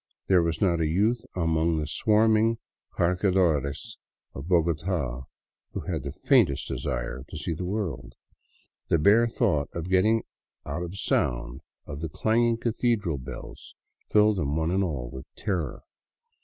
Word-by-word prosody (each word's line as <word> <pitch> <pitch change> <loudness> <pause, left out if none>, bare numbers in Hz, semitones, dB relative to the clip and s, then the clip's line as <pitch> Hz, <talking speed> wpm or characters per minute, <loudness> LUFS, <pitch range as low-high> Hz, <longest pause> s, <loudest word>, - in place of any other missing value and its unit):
There 95 -2 +4
was 85 -1 -1
not 85 -4 +2
a 80 - +2
youth 110 +9 +1
among 80 -1 +1
the 75 - -1
swarming 110 +4 +3 0.4
cargadores 90 -5 +1 0.3
of 65 +4 -7
Bogota 80 -6 0 0.5
who - - -3
had 80 -5 -3
the 70 +1 -5
faintest 70 -1 +2
desire 65 +1 -3
to - - -7
see 75 +3 -3
the 90 +3 -4
world; 80 - -4 0.7
the - - +3
bare 105 +9 +5
thought 100 - 0
of 85 +2 -5
getting 110 +5 +3 0.4
out 75 +5 -4
of 90 +2 -6
sound - - -1 0.2
of 70 -1 -7
the 80 - -3
clanging 115 +7 +2
cathedral 115 - 0
bells 65 -1 -10 0.3
filled 105 -1 +4
them 75 -4 -1
one 80 +1 0
and 95 +2 +2
all 70 -9 -3
with 65 -2 -9
terror. 85 -9 -3
85 Hz, 145 wpm, -27 LUFS, 75-100 Hz, 0.7 s, bare